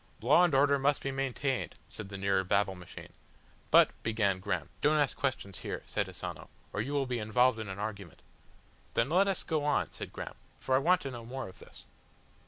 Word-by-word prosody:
"Law 145 +10 +5
and 175 -6 +3
order 140 +1 +4
must 140 +1 +2
be 135 - -1
maintained," 135 0 -2
said 100 - -8
the 100 - -6
nearer 95 -1 +1
Babble 100 +1 +2
Machine. 90 -2 -11 0.6
"But," - - +7
began 105 -4 +1
Graham. 95 -3 -2
"Don't 150 +1 +4
ask 145 -3 +2
questions 125 -8 -2
here," - - -5
said - - -1
Asano, - - -7 0.2
"or 105 - 0
you 135 +6 -3
will 140 -1 +1
be 125 -2 -2
involved 115 +2 +3
in 110 -2 -5
an 95 - -5
argument." 100 -5 -6 0.7
"Then 115 - +2
let 185 +5 +4
us 195 - 0
go 155 -3 -1
on," 150 - +1
said - - -6
Graham, - - -6 0.3
"for 130 - -1
I 130 - +6
want 180 +5 +3
to 135 - -4
know 120 -2 -7
more 130 0 -5
of 95 - -12
this." - - -13
125 Hz, 205 wpm, -31 LUFS, 100-140 Hz, 0.7 s, But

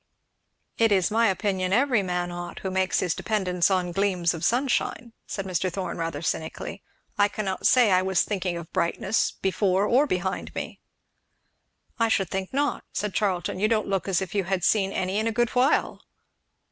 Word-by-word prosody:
"It 225 -1 +4
is 190 -1 +3
my 230 +1 +3
opinion 190 -2 0
every 245 0 +3
man 180 -1 -2
ought, 175 0 -7
who 190 - -3
makes 190 0 +1
his 180 - 0
dependance 185 -5 0
on 180 -2 0
gleams 180 -2 +1
of 165 - -7
sunshine," 240 -2 0
said 195 - -4
Mr. 185 0 -1
Thorn 185 -1 -4
rather 165 -2 -3
cynically. 160 0 -4 0.4
"I 205 - +6
cannot 200 -3 -2
say 245 -5 +5
I 185 0 +4
was 190 -1 +2
thinking 185 -4 -2
of 170 0 -9
brightness 190 +5 +1
before 190 +1 0
or 260 +7 +3
behind 185 -3 -3
me." - - -5 1.2
"I 230 - +3
should 195 -5 0
think 190 -1 -3
not," 285 +2 0
said 210 -2 -2
Charlton; 185 -4 -1
"you 210 - +3
don't 215 -2 0
look 195 -2 -1
as 190 -1 +1
if 185 - -8
you 200 -3 0
had 190 -1 -1
seen 195 -1 +2
any 190 +1 -1
in 220 - 0
a - - +1
good 240 +1 +1
while." 255 +3 +1
190 Hz, 185 wpm, -25 LUFS, 180-215 Hz, 1.2 s, I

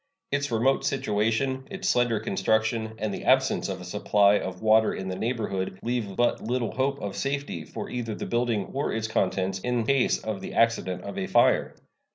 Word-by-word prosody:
Its 140 +1 0
remote 120 +4 +2
situation, 130 +2 0
its 195 -1 -4
slender 120 - +2
construction, 110 0 0
and 110 -2 -2
the - - -5
absence 130 -5 +3
of 95 -1 -4
a - - -9
supply 100 +2 +3
of 90 -1 -5
water 110 0 +4
in 95 0 -5
the 95 - -3
neighborhood 105 -5 -2
leave 115 -5 -2
but 120 +3 +1
little 120 0 -1
hope 135 +1 -1
of 100 -5 -5
safety 140 - -3
for - - -7
either 115 -3 -4
the - - -5
building 120 -4 0
or 140 +2 -1
its 110 0 -2
contents 95 -2 0
in 120 +2 -1
case 135 +1 +3
of 110 -3 -5
the - - -7
accident 95 -6 +1
of 100 - -5
a - - -2
fire. - - +3
110 Hz, 190 wpm, -26 LUFS, 100-125 Hz, -, water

